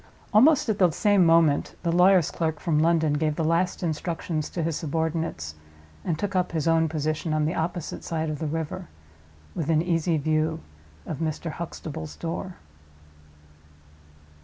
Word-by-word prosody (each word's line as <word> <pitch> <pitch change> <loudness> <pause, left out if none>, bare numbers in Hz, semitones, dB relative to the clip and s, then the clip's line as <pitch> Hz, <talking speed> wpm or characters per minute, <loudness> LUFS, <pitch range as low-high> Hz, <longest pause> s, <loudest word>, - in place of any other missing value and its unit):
Almost 270 +8 +5
at 215 -2 0
the 180 -2 +6
same 200 +4 +3
moment 165 -3 +3
the 170 - +1
lawyer's 180 -1 +5
clerk 160 -2 -2
from 150 -1 +1
London 160 -2 +3
gave 150 0 0
the 165 - -1
last 170 +4 +1
instructions 160 -1 -2
to 170 - -3
his 165 -1 -1
subordinates, 160 - -2 0.5
and 165 -3 -1
took 200 +2 -3
up 180 -2 0
his 160 -1 -1
own 165 -1 +3
position, 155 +1 -2
on 155 -1 +1
the 160 - 0
opposite 170 0 -3
side 160 -1 -2
of 150 - -5
the 160 - -2
river, 165 +4 -4 0.7
within 160 0 +1
easy 165 -1 +1
view 155 +2 0 0.4
of 150 - -5
Mr. 160 0 -3
Huxtable's 160 -2 -6
door. 175 +2 -5
165 Hz, 155 wpm, -26 LUFS, 155-175 Hz, 0.7 s, the